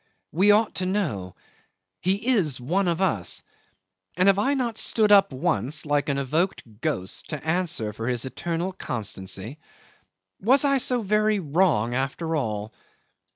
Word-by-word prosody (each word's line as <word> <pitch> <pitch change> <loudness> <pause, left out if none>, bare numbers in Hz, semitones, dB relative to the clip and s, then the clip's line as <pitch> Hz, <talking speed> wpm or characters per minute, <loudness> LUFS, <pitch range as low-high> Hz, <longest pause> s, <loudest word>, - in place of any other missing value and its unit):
We 190 +6 +3
ought 210 +1 +4
to 185 - -1
know. 145 - -2 0.6
He 195 +7 0
is 170 - +2
one 180 +10 0
of 170 +1 0
us 115 - 0 0.7
and 185 +1 +3
have 195 0 +3
I 275 +7 +2
not 240 -4 -2
stood 215 -2 +2
up 200 -3 +6
once, 130 +3 -1
like 145 0 0
an 140 - 0
evoked 155 +8 0 0.2
ghost, 95 -12 -3
to 150 -2 -5
answer 160 -11 -1
for 115 +2 -5
his 125 -1 0
eternal 170 +6 -3
constancy? 105 - -5 0.8
Was 265 +7 +4
I 275 -1 +3
so 245 -2 +1
very 210 +1 +2
wrong 145 - +1
after 140 +6 -2
all? 110 -6 -3
165 Hz, 150 wpm, -25 LUFS, 125-200 Hz, 0.8 s, up